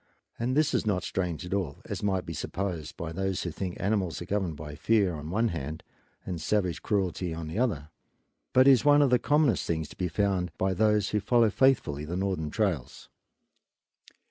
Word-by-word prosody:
And 125 Hz, +4 st, 0 dB
this 155 Hz, -1 st, +3 dB
is -, -, +1 dB
not 100 Hz, -4 st, 0 dB
strange 90 Hz, -4 st, -3 dB
at 90 Hz, -, -4 dB
all, 90 Hz, -8 st, -2 dB
as -, -, -5 dB
might 95 Hz, -3 st, 0 dB
be 85 Hz, -, -5 dB
supposed 85 Hz, -1 st, -4 dB
by 85 Hz, -1 st, -5 dB
those 95 Hz, +2 st, -2 dB
who 85 Hz, -, -3 dB
think 90 Hz, +2 st, -5 dB
animals 95 Hz, -6 st, 0 dB
are 85 Hz, -, -6 dB
governed 95 Hz, -4 st, -1 dB
by 75 Hz, -1 st, -7 dB
fear 100 Hz, +4 st, +2 dB
on 75 Hz, 0 st, -6 dB
one 110 Hz, +6 st, +1 dB
hand 80 Hz, -2 st, -5 dB, 0.4 s
and 90 Hz, -4 st, -4 dB
savage 90 Hz, -3 st, 0 dB
cruelty 90 Hz, -4 st, -1 dB
on 80 Hz, -1 st, -5 dB
the 85 Hz, +8 st, -3 dB
other, 90 Hz, -, 0 dB, 0.6 s
but 130 Hz, +1 st, +5 dB
is 130 Hz, -5 st, +6 dB
one 145 Hz, 0 st, +6 dB
of 135 Hz, -, +2 dB
the 125 Hz, -, +5 dB
commonest 145 Hz, -4 st, +2 dB
things 80 Hz, -2 st, -1 dB
to -, -, -12 dB
be 90 Hz, -, -1 dB
found 90 Hz, -1 st, 0 dB
by 95 Hz, 0 st, +1 dB
those 105 Hz, 0 st, +2 dB
who 105 Hz, -, +1 dB
follow 115 Hz, +1 st, +3 dB
faithfully 105 Hz, -, +2 dB
the 85 Hz, +4 st, -4 dB
northern 95 Hz, -5 st, -1 dB
trails. 90 Hz, -, -2 dB
95 Hz, 195 wpm, -28 LUFS, 80-105 Hz, 0.6 s, is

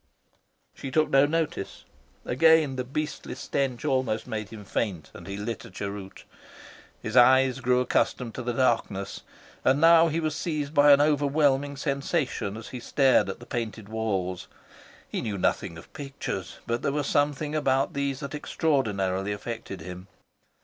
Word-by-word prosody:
She 135 Hz, -, -7 dB
took 155 Hz, +3 st, +1 dB
no 135 Hz, +1 st, +5 dB
notice. 160 Hz, -8 st, -3 dB, 0.4 s
Again 155 Hz, +1 st, +4 dB
the 130 Hz, -, -2 dB
beastly 150 Hz, +4 st, -4 dB
stench 135 Hz, 0 st, -2 dB
almost 130 Hz, -6 st, 0 dB
made 110 Hz, -4 st, -4 dB
him 105 Hz, -2 st, -10 dB
faint, 95 Hz, -5 st, -3 dB
and -, -, -11 dB
he 100 Hz, 0 st, -5 dB
lit 105 Hz, +2 st, -4 dB
a -, -, -11 dB
cheroot. 100 Hz, +1 st, -7 dB, 0.8 s
His 110 Hz, -, -5 dB
eyes 130 Hz, +1 st, +6 dB
grew 125 Hz, 0 st, +2 dB
accustomed 125 Hz, -1 st, 0 dB
to -, -, -5 dB
the 120 Hz, 0 st, -2 dB
darkness, 115 Hz, -6 st, 0 dB, 0.4 s
and 135 Hz, +2 st, +3 dB
now 165 Hz, +1 st, +7 dB
he 160 Hz, +1 st, -1 dB
was 155 Hz, -2 st, -1 dB
seized 150 Hz, -3 st, -3 dB
by 145 Hz, -1 st, +6 dB
an 140 Hz, 0 st, +7 dB
overwhelming 145 Hz, -1 st, +2 dB
sensation 140 Hz, -, -1 dB
as 110 Hz, -, -9 dB
he 125 Hz, -, -6 dB
stared 135 Hz, +1 st, +3 dB
at -, -, -5 dB
the 120 Hz, -, -11 dB
painted 110 Hz, -5 st, -4 dB
walls. 95 Hz, -5 st, -2 dB, 0.6 s
He -, -, -3 dB
knew 105 Hz, -3 st, -3 dB
nothing 90 Hz, -1 st, -1 dB
of 85 Hz, -, -14 dB
pictures, 140 Hz, -2 st, -5 dB
but 120 Hz, +1 st, -1 dB
there -, -, 0 dB
was 145 Hz, 0 st, -1 dB
something 145 Hz, +1 st, 0 dB
about 135 Hz, 0 st, +1 dB
these 140 Hz, -1 st, -2 dB
that 140 Hz, -, -6 dB
extraordinarily 105 Hz, -, 0 dB
affected 105 Hz, -3 st, -6 dB
him. 90 Hz, +2 st, -8 dB
130 Hz, 160 wpm, -27 LUFS, 110-145 Hz, 0.8 s, now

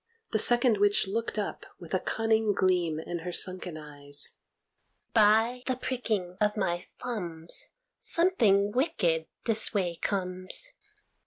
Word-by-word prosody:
The 220 Hz, -, +1 dB
second 240 Hz, -1 st, +5 dB
witch 205 Hz, +1 st, +4 dB
looked 225 Hz, +3 st, -3 dB
up 210 Hz, -, -3 dB, 0.2 s
with -, -, -11 dB
a -, -, +2 dB
cunning 220 Hz, -1 st, +1 dB
gleam 180 Hz, -5 st, +1 dB
in 170 Hz, +1 st, -5 dB
her 175 Hz, +2 st, -5 dB
sunken 180 Hz, -2 st, -4 dB
eyes. 145 Hz, -1 st, -1 dB, 0.7 s
"By 225 Hz, +3 st, +4 dB
the 260 Hz, -, +1 dB
pricking 220 Hz, -8 st, -3 dB
of 210 Hz, 0 st, +1 dB
my 175 Hz, -3 st, -1 dB
thumbs, 170 Hz, -9 st, -2 dB, 0.3 s
Something 220 Hz, -, +3 dB
wicked 195 Hz, -, 0 dB, 0.2 s
this 220 Hz, -1 st, +3 dB
way 175 Hz, -4 st, 0 dB
comes. 185 Hz, -, -2 dB
205 Hz, 130 wpm, -28 LUFS, 175-225 Hz, 0.7 s, second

